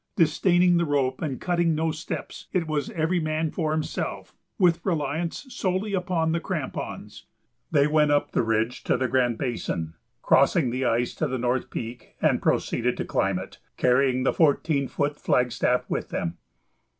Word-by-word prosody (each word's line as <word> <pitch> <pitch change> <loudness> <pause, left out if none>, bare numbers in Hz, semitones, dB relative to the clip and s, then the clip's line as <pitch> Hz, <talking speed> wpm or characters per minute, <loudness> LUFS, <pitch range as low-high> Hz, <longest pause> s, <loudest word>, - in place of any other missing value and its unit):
Disdaining 175 +1 +4
the 170 - +2
rope 135 -3 0
and 140 -5 -3
cutting 170 -2 +1
no 160 +1 0
steps, 155 +1 -6
it 180 -3 +1
was 155 +5 -2
"every 175 -3 0
man 155 0 -1
for 155 -4 -1
himself," 155 0 -3 0.2
with 175 -3 +3
reliance 165 - -2
solely 200 -3 -2
upon 180 -3 0
the 170 - +1
crampons. 165 -6 -5 0.4
They 145 -3 +4
went 150 0 +3
up 145 0 +2
the - - +2
ridge 115 +1 0
to - - +2
the 130 0 0
Grand 120 -2 +1
Basin, 110 - -3 0.3
crossed 140 +6 +4
the 130 -5 +1
ice 120 +1 +1
to 155 - -1
the 130 -1 -2
North 125 +1 -1
Peak, 115 0 -7
and - - +2
proceeded - - 0
to - - -2
climb - - 0
it, - - -8 0.2
carrying 130 0 +3
the - - +2
fourteen 145 -2 +2
foot 145 +2 -2
flagstaff 125 0 +1
with - - -3
them. 85 0 -3
150 Hz, 165 wpm, -25 LUFS, 125-170 Hz, 0.4 s, Disdaining